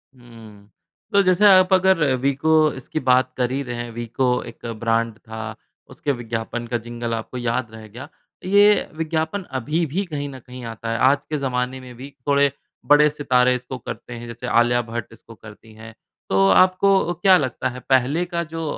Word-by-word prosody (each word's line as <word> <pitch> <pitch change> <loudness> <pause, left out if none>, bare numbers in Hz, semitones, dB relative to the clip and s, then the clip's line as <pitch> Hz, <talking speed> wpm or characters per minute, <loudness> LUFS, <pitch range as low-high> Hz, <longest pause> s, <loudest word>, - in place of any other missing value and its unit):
हुँ। 110 -4 -15 0.4
तो 200 - +6
जैसे 185 +2 +3
आप 185 -1 +6
अगर 190 -2 +3
अ, - - +2
वीको 150 +4 +2
इसकी 130 +4 -5
बात 130 -2 +2
कर 125 -1 0
ही 135 +2 -1
रहे 120 -2 -5
हैं 120 0 -5
वीको 120 +3 -2 0.2
एक - - -17
ब्रांड 115 -1 0
था, 110 -1 -8 0.3
उसके 145 - -3
विज्ञापन 120 0 -4
का 120 +1 -1
जिंगल 120 0 -4
आपको 115 +3 -5
याद 120 -1 -2
रह 110 -1 -11
गया, 120 +7 -10 0.4
ये 205 +2 +4
विज्ञापन 160 +4 -2 0.2
अभी 155 +7 -1
भी 175 +7 -2
कहीं 145 -4 -5
न 130 -1 -10
कहीं 125 +1 -11
आता 115 0 -6
है। 115 - -1
आज 140 - 0
के 155 - -1
ज़माने 130 -1 -2
में 125 -1 -12
भी 130 +4 -9 0.2
थोड़े 140 0 +3 0.3
बड़े 150 +1 +5
सितारे 125 -4 +2
इसको 125 +1 -6
करते 120 0 -8
हैं, 120 0 -8
जैसे 120 +1 -7
आलिया 120 0 +3
भट्ट 115 -1 -5
इसको 115 0 -15
करती 110 +1 -15
हैं, 110 +1 -12 0.4
तो 95 0 +3
आपको 185 - +4
क्या 185 +2 +5
लगता 130 -5 -2
है 125 0 -8
पहले 135 +6 +2
का 170 -1 -3
जो 165 0 -6
125 Hz, 190 wpm, -21 LUFS, 115-155 Hz, 0.4 s, तो